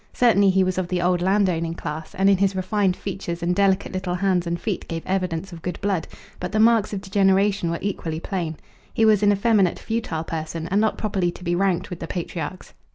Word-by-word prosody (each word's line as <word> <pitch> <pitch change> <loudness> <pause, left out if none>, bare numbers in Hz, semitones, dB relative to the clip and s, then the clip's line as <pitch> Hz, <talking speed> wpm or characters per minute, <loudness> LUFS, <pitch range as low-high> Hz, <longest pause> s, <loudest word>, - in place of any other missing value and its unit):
Certainly 205 -5 +4
he 190 0 +3
was 185 0 0
of 185 - -2
the 180 0 -1
old 175 0 +1
landowning 180 -4 +1
class, 155 -1 -6
and 195 +1 +2
in 200 -1 +5
his 195 -1 +2
refined 190 0 +1
features 175 -4 -5
and 175 +1 +1
delicate 195 0 +2
little 185 -1 -2
hands 180 -2 +1
and 170 0 -2
feet 205 -2 -3
gave 165 -1 -5
evidence 185 -1 -2
of 165 - -9
good 180 - -4
blood, 195 -4 -1 0.3
but 180 - -4
the 215 - 0
marks 225 -1 +4
of 200 -2 -3
degeneration 195 -1 +2
were 170 - -1
equally 165 -5 -3
plain; 170 -4 -3 0.4
he 225 - +4
was 215 -2 +5
an 205 -1 +5
effeminate, 200 -3 +2
futile 220 -8 -3
person, 160 0 -4
and 200 +3 +2
not 220 - +1
properly 195 -4 0
to 175 - -9
be 175 -1 0
ranked 185 -1 0
with 175 - -5
the 165 - -5
patriarchs. 175 +1 -5
185 Hz, 220 wpm, -23 LUFS, 170-200 Hz, 0.4 s, in